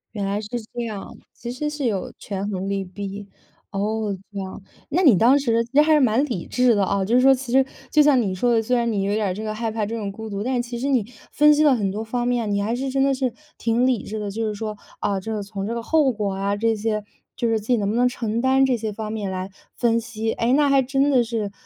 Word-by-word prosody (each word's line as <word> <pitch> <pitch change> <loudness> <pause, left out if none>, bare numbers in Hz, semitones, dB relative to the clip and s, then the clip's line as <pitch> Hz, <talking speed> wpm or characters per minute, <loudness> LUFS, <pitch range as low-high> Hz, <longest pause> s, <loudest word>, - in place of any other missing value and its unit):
原 200 -2 -2
来 200 +1 -1
是 215 - -7 0.3
这 240 - -3
样， 215 +1 -6 0.2
其 240 0 -7
实 300 +4 -3
是 295 -3 -4
有 200 -5 -2
权 200 0 -4
衡 195 0 -3
利 195 -1 -1
弊。 200 +2 -7 0.4
哦， 205 0 -1
这 200 - -5
样。 190 +1 -6 0.3
那 345 +6 +1
你 245 - +7
当 250 +7 +5
时 230 -4 +1
其 240 - -25
实 295 - +8
还 315 +1 +3
是 300 - +5
蛮 250 +1 +3
理 195 -10 -4
智 250 -2 +3
的 200 -2 +2
啊， 200 0 0
就 220 +5 -1
是 250 - +6
说 270 +1 +7
其 255 -2 -7
实 265 +1 +4 0.3
就 305 - +5
像 290 -3 +5
你 195 -4 -1
说 240 +6 +1
的， 225 - +3
虽 250 +2 +1
然 235 0 +1
你 200 -3 0
有 200 +1 0
点 210 -2 0
儿 180 - -1
这 215 - -6
个 215 0 -3
害 225 +1 -2
怕 215 -1 -2
这 220 - -5
种 205 -3 -3
孤 220 +1 -7
独， 200 -1 -4
但 255 +3 -1
是 245 - +1
其 240 0 -6
实 270 - -1
你 255 -6 +2 0.3
分 300 +1 +6
析 295 - +2
了 285 -3 +5
很 200 -5 -1
多 210 +2 -4
方 240 +2 -2
面， 240 -3 0
你 200 0 0
还 220 +3 -1
是 265 +2 -2
真 270 +1 +1
的 275 0 +3
是 255 -2 -1 0.2
挺 235 +2 +1
理 250 -5 +1
智 220 - -5
的。 205 -1 -4
就 225 +2 -2
是 210 - -3
说， 215 0 -5 0.2
啊， 200 -2 0
这 220 +3 -5
个 210 - -3
从 200 0 -5
这 230 - -2
个 235 - -4
后 305 -2 +3
果 205 -2 -2
啊 200 +1 -1
这 225 +2 +1
些， 215 0 -2 0.3
就 235 -2 0
是 225 -1 +1
自 210 - -13
己 250 - +4
能 205 -3 -1
不 220 - 0
能 245 +1 +4
承 230 -2 -2
担 265 +2 +4
这 255 -2 +1
些 215 -1 -4
方 215 0 -5
面 210 -3 -3
来 185 +1 -4 0.2
分 230 -1 +2
析， 225 -1 -3
哎， 235 +2 +1
那 285 0 +4
还 275 -1 +5
真 275 +2 +1
的 255 -3 +5
是， 220 -3 -3
225 Hz, 310 characters per minute, -23 LUFS, 205-250 Hz, 0.4 s, 实